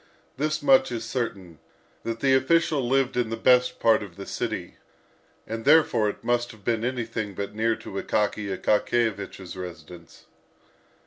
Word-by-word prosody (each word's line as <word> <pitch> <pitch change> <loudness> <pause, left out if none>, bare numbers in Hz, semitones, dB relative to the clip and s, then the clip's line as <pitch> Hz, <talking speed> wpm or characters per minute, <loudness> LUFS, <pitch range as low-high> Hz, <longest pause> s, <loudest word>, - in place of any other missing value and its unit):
This 155 +2 -1
much 135 -2 +5
is 115 -2 -4
certain, 100 - -4 0.4
that 115 0 -4
the 135 -1 +4
official 140 -1 +2
lived 135 -1 +2
in 120 -2 0
the 115 - -3
best 125 +1 +3
part 115 -1 +4
of 100 -4 -9
the 100 - -8
city; - - -4 0.7
and 115 0 -5
therefore 135 -7 +4
it - - -8
must 120 0 0
have 105 -3 -19
been 115 -2 0
anything 115 -5 -3
but 100 +1 -4
near 110 +1 +1
to 95 - -6
Akaky 105 -1 -1
Akakiyevich's 105 -4 -1
residence. 85 -2 -10
115 Hz, 150 wpm, -25 LUFS, 100-125 Hz, 0.7 s, much